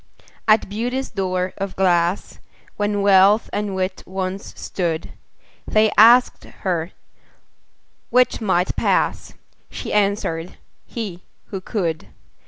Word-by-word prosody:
At 215 0 +4
Beauty's 245 +6 -3
door 185 -1 -2
of 195 -1 -4
glass, 175 -1 +1 0.4
When 205 -1 -1
Wealth 200 +2 +5
and 205 -1 -2
Wit 185 0 -2
once 190 +1 -4
stood, 170 -3 -3 0.6
They 215 0 +3
asked 240 +3 +6
her 175 -2 -3 1.2
'which 250 -1 +2
might 185 -3 +1
pass?" - - 0 0.4
She - - -6
answered, 200 -5 -1 0.3
"he, 200 -7 -6 0.3
who 195 -2 -5
could." 170 -6 -3
195 Hz, 105 wpm, -21 LUFS, 185-210 Hz, 1.2 s, asked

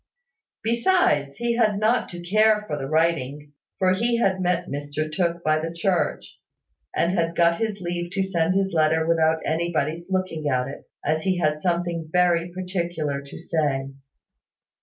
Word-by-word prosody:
Besides, 235 - +2
he 235 0 -1
had 215 -4 +3
not 225 +3 +2
to 175 -1 -8
care 215 +2 +4
for 150 - -3
the 135 -2 -4
writing; 150 -2 0 0.2
for 185 -1 +3
he 235 +5 +1
had 190 -5 +1
met 180 -1 +1
Mr 145 +1 -4
Tooke 170 0 -1
by 155 0 +2
the 165 +1 -3
church, 170 +1 -1 0.6
and 170 - +2
had 170 -2 0
got 170 0 +3
his 215 -3 -2
leave 175 0 -3
to 195 -1 +1
send 180 -1 0
his 195 -1 +1
letter 160 0 +3
without 160 -1 +2
anybody's 165 +1 -1
looking 185 -5 -1
at 125 -1 +1
it, 135 - -10 0.2
as 155 +2 +1
he 185 +2 0
had 150 -3 0
something 170 -2 -1
very 175 -1 +2
particular 175 -6 -3
to 140 - -11
say. 145 -5 -1
170 Hz, 160 wpm, -24 LUFS, 155-185 Hz, 0.6 s, care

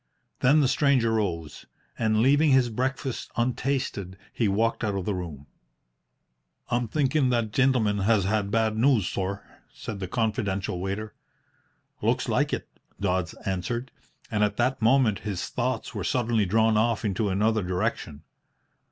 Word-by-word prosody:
Then 145 +5 +5
the 135 - +3
stranger 130 -4 +2
rose, 85 -8 -3 0.3
and, 110 0 +1
leaving 145 +4 +4
his 130 -3 +4
breakfast 130 +2 -3
untasted, 120 -6 -1 0.2
he 115 - +1
walked 115 +5 0
out 105 -2 0
of 95 -2 -3
the 105 - 0
room. 80 -6 -6 1.2
"I'm 120 0 0
thinkin' 135 +2 +1
that 115 -3 0
the 135 - +2
gintleman 115 -6 +2
has 100 0 +3
had 100 +1 0
bad 110 0 +1
news, 115 -5 +3
sorr," 100 +1 -3 0.3
said 105 -3 -7
the 95 - -4
confidential 100 -4 -1
waiter. 100 +3 -4 0.9
"Looks - - +1
like - - +1
it," - - -3 0.3
Dodds 90 -4 -1
answered; 100 +7 -3 0.4
and 105 -1 +1
at 105 - 0
that 125 +1 0
moment 115 -2 +3
his 100 -4 -4
thoughts 125 -1 -2
were - - -4
suddenly 115 -4 +1
drawn 110 +2 +3
off 115 +1 +1
into 105 +1 0
another 110 +3 +1
direction. 90 -5 -3
110 Hz, 150 wpm, -26 LUFS, 100-125 Hz, 1.2 s, Then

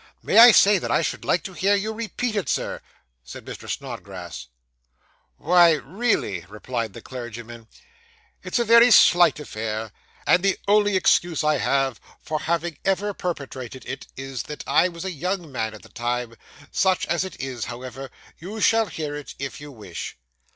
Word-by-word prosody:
'May - - +4
I 240 +1 +11
say 205 -2 +6
that - - -4
I - - +2
should - - -3
like 180 - +1
to 190 - -7
hear 195 +3 +2
you 210 +2 -2
repeat 230 +1 -3
it, 205 - -1
sir?' - - -2 0.4
said 60 - -10
Mr. - - -9
Snodgrass. - - -7 0.9
'Why, 175 +1 +5
really,' 155 - -1
replied 115 0 -4
the - - -11
clergyman, 120 -2 -8 0.7
'it's - - -2
a 235 - +1
very 235 +2 +7
slight 175 -8 +6
affair; 110 -5 -5 0.3
and 180 - +4
the 195 0 +1
only 205 -1 +4
excuse 175 -3 +2
I 150 0 +2
have 135 -4 0 0.2
for 155 0 -3
having 170 -1 -2
ever 200 +2 0
perpetrated 135 -8 -6
it - - -6
is, 135 -2 -5
that 150 - -7
I - - +3
was 170 +1 -8
a 190 - -2
young 175 0 -3
man 110 -3 -3
at 110 - -14
the - - -15
time. 120 0 -3 0.4
Such 190 -2 +2
as 170 +2 0
it 190 - -8
is, 130 -4 -4
however, 130 +2 -7 0.3
you 200 +6 -7
shall 225 +1 +3
hear 155 -5 -5
it, 145 -1 -8
if 135 +1 -6
you 145 0 -9
wish. 105 -9 -8
155 Hz, 170 wpm, -23 LUFS, 125-195 Hz, 0.9 s, I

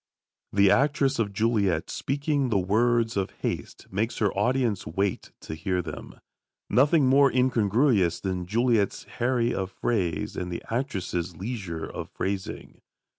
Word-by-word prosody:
The 100 -1 +5
actress 140 -1 +2
of 105 -3 0
Juliet, 100 -5 +1
speaking 140 -1 -1
the 105 - +2
words 115 +4 +2
of 95 -2 0
haste, - - -4
makes 110 +5 -1
her 105 -3 +1
audience 115 -2 0
wait 95 +4 -2
to - - -7
hear 90 +3 -1
them. 80 -2 -8 0.5
Nothing 145 +3 +4
more 135 +2 +5
incongruous 115 - +2
than 90 -2 -3
Juliet's 115 -1 +1
harry 120 -1 0
of 95 -1 -2
phrase 90 -8 -1
and 90 0 -4
the 85 - -5
actress's 95 - -2
leisure 95 -6 -4
of - - -7
phrasing. 95 -1 -5
105 Hz, 135 wpm, -26 LUFS, 95-125 Hz, 0.5 s, The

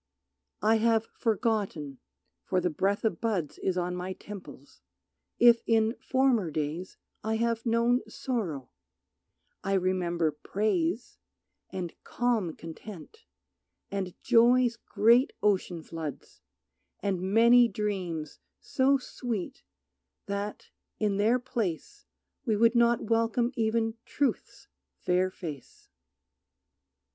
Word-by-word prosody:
I 220 +1 +5
have 225 0 +2
forgotten, 205 - -1 0.4
for 185 - 0
the 180 -1 0
breath 195 +7 0
of 190 -7 0
buds 200 -10 -1
Is 185 -1 -1
on 180 0 -1
my 180 +1 -4
temples, 200 0 -11 0.6
if 235 -1 +6
in 225 +1 +3
former 260 -8 +2
days 155 +4 -4 0.3
I 220 +1 0
have 230 +1 -1
known 235 +2 +3
sorrow; 180 - -3 0.9
I 195 - -1
remember 175 -3 +1
praise, 190 +6 -1 0.5
And 180 -3 -5
calm 225 -9 0
content, 195 - -10 0.7
and 190 -3 -4
joy's 240 0 +5
great 230 +4 +3
ocean 185 -5 +1
floods, 160 -4 -7 0.6
And 190 -3 -1
many 235 +5 +6
dreams 185 -8 -3 0.2
so 275 0 +2
sweet 240 -6 -5 0.6
that, 200 +1 -5 0.3
in 205 -2 0
their 220 +5 +3
place, 230 - -4 0.4
We 220 - +1
would 230 +2 +4
not 235 -1 +3
welcome 230 +2 +1
even 225 -1 0
Truth's 280 -2 -2 0.3
fair 180 +1 +1
face. 155 -8 -9
210 Hz, 105 wpm, -29 LUFS, 180-235 Hz, 0.9 s, if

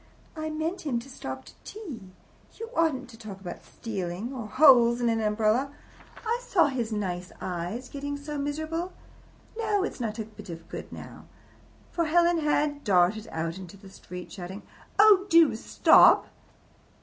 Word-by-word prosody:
I 315 0 -3
meant 320 +4 -3
him 275 -6 -1
to 235 +3 -6
stop 130 - -7
to - - -12
tea. 290 - -9 0.5
You 455 +1 -6
oughtn't 285 -6 +1
to 225 - -13
talk 210 -4 -8
about 180 -3 -8
stealing 200 +2 -5
or 235 -5 -5
holes 245 -2 +6
in 240 -1 +2
an 225 -1 +1
umbrella. 215 +5 +1 0.5
I 465 +2 0
saw 350 -10 +3
his 240 -4 -2
nice 185 -4 -3
eyes 180 +8 -4
getting 285 +1 -5
so 290 +1 -5
miserable. 315 +5 -3 0.6
No, 425 -3 0
it's - - -4
not 220 -3 -3
a 220 - -3
bit 215 -3 -13
of 165 -1 -8
good - - -7
now." - - -10 0.7
For 335 - 0
Helen 340 +1 +3
had 295 -1 0
darted 195 +3 +3
out 165 +3 -4
into 190 +1 -10
the 195 -1 -14
street, 180 -1 -9
shouting, 190 +1 -8 0.3
"Oh, 410 -2 +6
do 330 - +6
stop!" 220 - +6
245 Hz, 160 wpm, -27 LUFS, 200-315 Hz, 0.7 s, holes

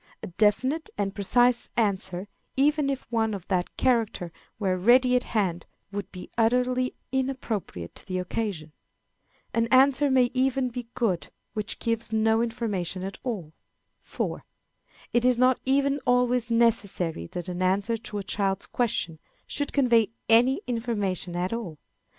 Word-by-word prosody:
A - - -4
definite 240 - +1
and 200 -1 -1
precise 240 +4 +2
answer, 190 -3 0 0.3
even 290 +1 +3
if 270 -1 -2
one 220 -2 +1
of 185 -3 -9
that 180 -2 -1
character 225 -8 +1 0.3
were 190 -3 0
ready 250 +7 +5
at 250 - +3
hand, 190 -8 -1 0.2
would 205 0 -5
be 180 - -10
utterly 250 +2 +2 0.2
inappropriate 255 - -3
to - - -13
the 185 -1 -2
occasion. 180 -4 -3 0.8
An 230 0 +2
Answer 275 +3 +5
may 255 -2 +4
even 260 0 +1
be 245 -1 -6
good 220 -9 0 0.2
which 215 -1 -3
gives 230 -1 -2
no 220 0 +3
Information 210 -6 -2
at 195 +1 -6
all. 190 -11 -4 0.5
4. - - -4 0.7
It 240 - +3
is 250 -1 +4
not 255 +1 +4
even 280 +1 +2
always 245 -1 +3
necessary 200 - +1
that 175 - -6
an 180 0 -4
answer 195 +5 +1
to 225 -2 -5
a 200 - -3
child's 195 0 -1
question 175 -9 -1 0.3
should 285 -1 -2
convey 235 -6 +4 0.2
any 245 +4 +5
information 205 -7 -2
at 180 +4 -1
all. 215 -10 -5
230 Hz, 145 wpm, -26 LUFS, 190-250 Hz, 0.8 s, ready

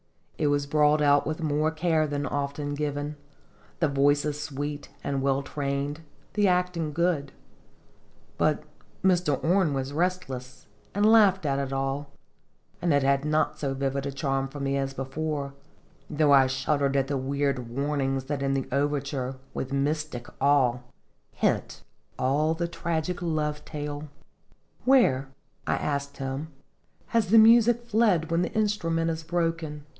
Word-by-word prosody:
It 150 - +2
was 145 0 +1
brought 150 +1 +3
out 145 0 +4
with 155 +1 -3
more 150 0 +1
care 160 -1 +1
than 145 0 -2
often 145 +1 -3
given, 145 0 -3 0.6
the 165 - +3
voices 145 +1 +1
sweet 145 0 -5
and 140 -1 -1
well 135 0 +1
trained, 140 +2 -3 0.3
the 205 -1 +3
acting 180 -3 0
good; 160 -4 0 1.1
but - - +2 0.4
Mr. 175 -7 +2
Orne 170 -3 +2
was 135 +1 -3
restless, 145 -7 -3 0.3
and 205 +1 +3
laughed 205 -5 +5
at 140 -1 +1
it 135 -1 -3
all; 135 +1 -2 0.7
and 175 -1 +1
it 140 -1 +3
had 140 0 +2
not 155 +1 0
so 135 -2 -2
vivid 135 +1 -2
a - - -3
charm 135 0 -1
for 145 +2 -9
me 140 0 -1
as 135 0 -2
before, 140 +1 -3 0.6
though 150 -1 +3
I 135 -1 +6
shuddered 140 +1 0
at 135 - +2
the 140 -1 -1
weird 135 -2 -1
warnings 135 +1 -1
that 140 +1 -3
in 135 0 +1
the 135 - -2
overture, 140 -1 -1 0.2
with 130 - -4
mystic 140 -2 -1 0.2
awe, 135 -3 +3 0.5
hint - - -1 0.3
all 150 +5 +1
the 170 +1 -1
tragic 170 +1 -3
love 150 -3 -1
tale. 150 0 -6 0.8
"Where," 235 - +4 0.4
I - - +2
asked 140 -1 -3
him, 135 +2 -4 0.6
"has 230 -3 +2
the 225 +5 +5
music 235 +1 +6
fled 210 -8 +2
when 165 +1 +2
the 175 - -1
instrument 165 -7 0
is 160 0 -4
broken? 165 -3 -2
145 Hz, 150 wpm, -27 LUFS, 140-165 Hz, 1.1 s, I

